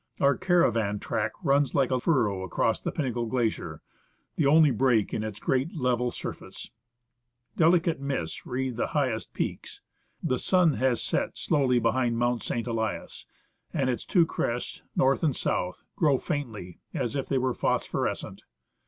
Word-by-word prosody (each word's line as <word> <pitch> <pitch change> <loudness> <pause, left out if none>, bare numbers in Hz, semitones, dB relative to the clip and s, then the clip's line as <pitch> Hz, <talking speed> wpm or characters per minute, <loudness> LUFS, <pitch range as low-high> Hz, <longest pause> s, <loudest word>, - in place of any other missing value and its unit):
Our 140 0 +4
caravan 115 - +2
track 105 +1 -2
runs 140 -3 +2
like 135 -2 +2
a 130 - +2
furrow 115 - +1
across 95 -2 0
the - - -2
Pinnacle 120 -6 -2
Glacier: 120 -2 -2 0.5
the 150 - +2
only 155 0 +6
break 125 -6 +2
in 110 - -1
its 105 -2 -5
great 135 +7 0
level 125 -4 +1
surface. - - -7 0.8
Delicate 165 -1 +3
mists 135 - -3
wreath 130 -1 -2
the - - 0
highest 125 -6 -1
peaks. - - -4 0.4
The 130 -1 0
sun 180 -4 +3
has 130 -3 +1
set - - -1
slowly 135 -5 +2
behind 120 0 +1
Mount 120 0 +1
St. 115 - -2
Elias, 110 -3 -3 0.5
and 135 -4 +1
its 120 - -3
two 175 -3 +3
crests, 120 -6 -3
north 135 +1 +3
and 150 -5 +2
south, 90 0 -2
glow 145 -5 +3
faintly, 120 - -5 0.2
as 120 - -2
if 135 - -2
they 135 - +1
were 130 0 +1
phosphorescent. - - -2
130 Hz, 155 wpm, -27 LUFS, 115-140 Hz, 0.8 s, only